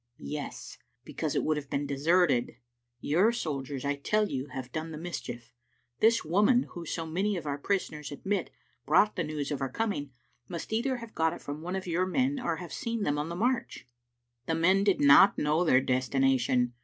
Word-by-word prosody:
"Yes, 150 -1 -7 0.2
because - - -3
it - - +1
would 155 -1 +1
have 140 -2 -6
been 140 +1 -1
deserted. 140 -2 +2 0.5
Your 180 +10 +3
soldiers, 140 - -4
I 145 0 +1
tell 210 +9 +1
you, 135 +1 -3
have 130 -1 -7
done 155 +3 -4
the 155 - -7
mischief. 135 -8 -6 0.5
This 225 -2 +4
woman, 210 +10 +4
who, 170 -2 -8
so 165 +1 -3
many 190 +5 -1
of 165 - -6
our 145 -1 -3
prisoners 150 -5 -2
admit, 195 +8 -2 0.3
brought 210 - +3
the 175 - -1
news 150 -2 -4
of 145 - -3
our 135 - -1
coming, 170 - -2 0.4
must 170 +6 -6
either 255 +3 0
have 230 -2 -10
got 160 0 +1
it - - -9
from 145 +2 -6
one 180 +3 -4
of 190 - -4
your 180 +1 0
men 265 +7 +1
or 170 -9 -1
have 175 +1 -8
seen 230 -2 -3
them 145 -3 0
on 150 +2 -3
the 170 - -4
march. 235 - -1 0.3
" 120 0 -52
"The 165 - +1
men 185 +4 +3
did 200 -2 +2
not 140 +7 +7
know 150 +3 +2
their 130 -6 +4
destination. 130 -1 +1
160 Hz, 200 wpm, -29 LUFS, 140-195 Hz, 0.5 s, not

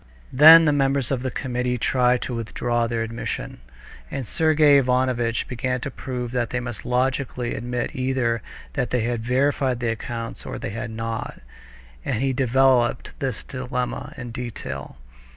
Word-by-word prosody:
Then 160 +5 +10
the 150 - +4
members 135 -2 +1
of 130 -2 0
the 130 - -2
committee 125 -1 -2
tried 125 +1 +2
to 125 - -4
withdraw 120 +1 -1
their 115 -1 -1
admission, 115 - -5 0.5
and 135 - -4
Sergey 155 +1 +4
Ivanovitch 125 -3 +1
began 125 +1 -2
to 140 - -4
prove 125 -2 -5
that 120 -2 -1
they 125 - -1
must 120 -4 -6
logically 125 -1 0
admit 120 +1 -3
either 130 -3 0 0.3
that 125 - -1
they 125 - +1
had 120 0 -1
verified 130 +1 +1
the 120 -1 -1
accounts 115 0 -5
or - - -7
that - - -6
they - - -3
had 115 +2 -4
not, 115 0 -4 0.6
and - - -1
he 135 0 +1
developed 130 -1 +2
this 130 -5 -3
dilemma 125 -1 -4
in 120 -2 -6
detail. 110 - -6
125 Hz, 160 wpm, -23 LUFS, 120-130 Hz, 0.6 s, Then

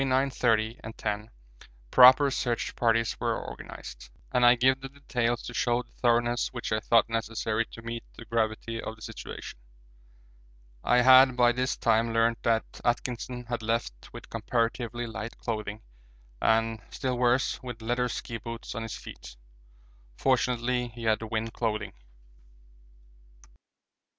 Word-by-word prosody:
30 130 -4 +1
and 110 +1 -8
10 105 +1 -3 0.6
proper 130 +3 +8
search 120 -2 -2
parties 115 -1 +2
were - - 0
organised, - - -9 0.2
and 125 - +2
I 120 0 +8
give 130 +2 +3
the 135 - -7
details 120 -4 -2
to - - -7
show 120 0 +1
the - - -29
thoroughness 120 0 +1
which 120 -2 -5
I 110 - +2
thought 115 +1 +3
necessary 115 0 -1
to 115 - -12
meet 115 0 -5
the 115 - -10
gravity 115 0 -1
of 110 - -6
the 110 - -14
situation. - - -8 1.2
I 125 0 +4
had 130 0 +7
by 120 -1 +5
this 125 +1 -1
time 115 0 +2
learnt 115 0 +2
that 115 -1 -1
Atkinson 125 0 -2
had 120 0 -3
left 110 - -3
with - - -10
comparatively 115 +1 -2
light 115 0 -6
clothing 110 -2 -4 0.6
and, 115 0 +2
still 130 -1 -2
worse, 125 +1 +2
with 120 -3 -8
leather 120 +2 0
ski 115 0 -5
boots 115 +1 -7
on 115 - -4
his 115 -1 -5
feet; - - -11 0.8
fortunately 125 -1 +1
he 120 0 -10
had 110 -1 +2
wind 110 0 -3
clothing. 110 -2 -2
115 Hz, 140 wpm, -28 LUFS, 115-125 Hz, 1.2 s, proper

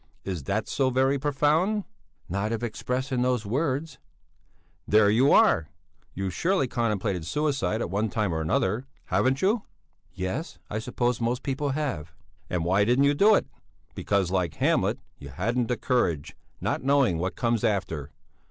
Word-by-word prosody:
Is 90 -8 -4
that 105 +6 -1
so 135 -2 +1
very 135 +2 +2
profound?" 150 +9 +1 0.4
"Not 100 +4 -2
if 115 0 -2
expressed 125 +4 -3
in 125 -2 +1
those 125 -3 +1
words." 140 +5 -2 0.9
"There 105 -1 +5
you 125 +6 +4
are! 80 -1 +4 0.5
You've 95 -1 -3
surely 180 - +1
contemplated 105 -7 -1
suicide 135 - -1
at 85 - -3
one 105 +3 0
time 105 -6 -1
or 80 - -1
another? 100 +10 0 0.2
Haven't 130 +4 +1
you?" 210 +4 +3 0.5
"Yes; 95 - -4
I 105 - -1
suppose 120 +1 -1
most 120 +2 -1
people 140 0 -1
have." 85 - -3 0.4
"And 85 -2 -1
why 95 +3 +3
didn't 125 +6 +3
you 145 - +4
do 205 +8 +5
it? - - +1 0.5
Because, 100 -3 0
like 90 -4 0
Hamlet, - - +1 0.2
you 70 - -9
hadn't 115 - -1
the 125 - -1
courage, 85 - 0 0.2
not - - -1
knowing 135 -10 +3
what 90 +2 -2
comes 115 -2 0
after. 90 - -1
120 Hz, 160 wpm, -26 LUFS, 95-135 Hz, 0.9 s, There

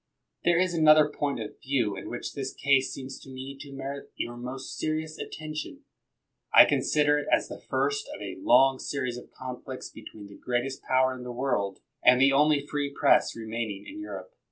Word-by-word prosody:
There 175 -1 +4
is 185 0 +2
another 155 -2 +6
point 145 -3 -2
of 110 - -8
view 125 -7 0
in 95 - -7
which 120 - -5
this 135 -2 -5
case 140 -1 +2
seems 130 0 -7
to - - -14
me 130 +1 -7
to 140 0 -9
merit 140 +1 -6
your 120 - -4
most 125 +2 -6
serious 155 0 -3
attention. 155 0 -6 0.7
I - - +10
consider 150 -1 +2
it 145 - -6
as - - +2
the - - -7
first 420 0 -1
of - - -7
a - - -6
long 135 - +5
series 130 -4 -3
of - - -15
conflicts 130 0 -7
between 110 -1 -11
the 100 0 -13
greatest 125 +2 -2
power 130 0 +2
in 130 - -9
the 125 0 -6
world 120 -6 -1 0.2
and 125 0 +7
the 135 +1 +5
only 145 0 +3
free 145 -1 -2
Press - - +3
remaining 110 -2 -4
in 310 - -9
Europe. 320 +9 -7
135 Hz, 190 wpm, -28 LUFS, 125-150 Hz, 0.7 s, I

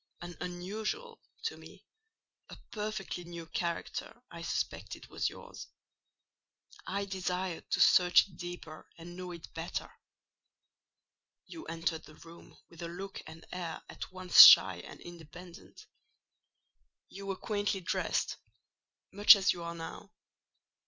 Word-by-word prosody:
An 175 0 -8
unusual—to 210 - -5
me—a 445 0 -18 0.2
perfectly 210 -4 -4
new 170 -1 -8
character 170 +7 -4
I 170 -1 -9
suspected 165 - -4
was - - -1
yours: - - -11 1.2
I 200 +1 -2
desired 185 -2 -3
to - - 0
search 180 +1 +6
it 195 - -18
deeper 175 -3 -9
and 170 +1 -10
know 180 0 -7
it 170 -2 -11
better. 165 +1 -5 1.5
You 330 -1 -10
entered 165 -1 -3
the 155 - -15
room 165 +1 -15
with 170 0 -14
a 170 - -4
look 190 +3 -7
and 160 +1 -12
air 175 -3 -5
at - - -8
once 185 -1 +7
shy 95 -2 +9
and 85 - -11
independent: 175 +2 -12 1.2
you 195 0 -10
were 195 - -2
quaintly 205 -1 -2
dressed—much 205 +3 +1
as 195 -1 +2
you 175 - -9
are 170 0 -5
now. 165 -1 -9
175 Hz, 120 wpm, -31 LUFS, 170-195 Hz, 1.5 s, shy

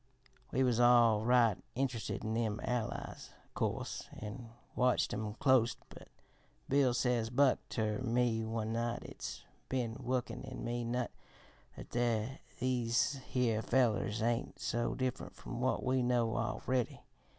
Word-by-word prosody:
"We 130 - +2
was 120 -2 +2
all 120 -3 +6
right 120 -4 +4 0.2
int'rested 125 -5 -2
in 110 - -2
them 110 -2 0
Allies, 120 -3 -3
o' - - -28
course, - - -2
an' 115 +3 -7 0.3
watched 125 0 +2
'em 105 -1 -3
clost; 130 -3 +3
but, - - -12 0.6
'Bill,' 135 -3 +3
says 120 -3 +1
Buck 130 +2 +4
ter 105 -2 -1
me 120 -2 +1
one 110 0 -2
night, 120 +1 -1
'its - - -7 0.3
been 125 -4 -1
woikin 125 0 -2
in 130 -1 -7
me 120 0 -2
nut 120 +1 -1 0.7
that - - -10 0.7
these 125 +2 +1
here 115 -4 +1
fellers 110 -3 +1
ain't 120 +1 0
so 120 0 -1
different 130 -1 -3
from 125 -1 -6
what 130 - +1
we 130 0 +2
know 120 -2 +2
a'ready. 120 +2 -1
120 Hz, 140 wpm, -34 LUFS, 115-125 Hz, 0.7 s, all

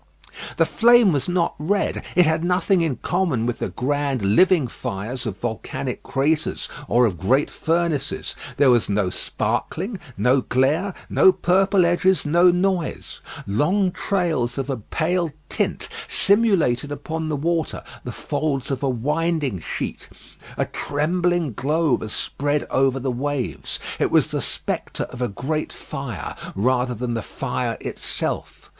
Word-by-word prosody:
The - - +4
flame 235 -3 +5
was 140 +2 -1
not 175 -1 +1
red; 195 +7 0
it 180 - +6
had 160 +1 +1
nothing 180 +1 +2
in 160 -6 0
common 170 -11 0
with 120 -1 -2
the - - -2
grand 140 -2 -1
living 155 - +4
fires 115 +4 -5
of 100 -3 -4
volcanic 120 +2 -4
craters 150 +3 0 0.2
or 120 +1 +4
of 95 -7 -1
great 130 +10 +2
furnaces. 165 -4 -1 0.2
There 140 -3 +6
was 120 -2 +3
no 100 -2 +1
sparkling, 195 - -2 0.2
no 130 +2 +3
glare, 150 +11 +1
no 190 - +6
purple 190 +1 +3
edges, 175 +2 +2
no 175 +4 +5
noise. 180 -1 -1 0.2
Long 180 - +2
trails 170 -12 -1
of 135 0 -2
a 130 - -2
pale 165 - -1 0.2
tint - - -1 0.2
simulated 190 - +3
upon 155 +2 -4
the 150 - 0
water 165 +2 -1 0.2
the - - -5
folds 140 -2 -2
of 135 - -2
a 140 - +1
winding 145 - 0
sheet. - - -5 0.5
A - - +1
trembling 170 0 0
glow 150 +5 +1
was 110 - -1
spread 145 +5 -1
over 135 0 +2
the 130 0 -1
waves. 130 - -3 0.2
It - - +2
was - - +3
the - - -1
spectre - - -3
of 125 - -8
a 125 - +1
great 135 +10 -3
fire, 125 - -6 0.2
rather 125 +4 +1
than 120 +1 -3
the 115 - -1
fire - - -3
itself. - - -4
145 Hz, 145 wpm, -22 LUFS, 125-175 Hz, 0.5 s, it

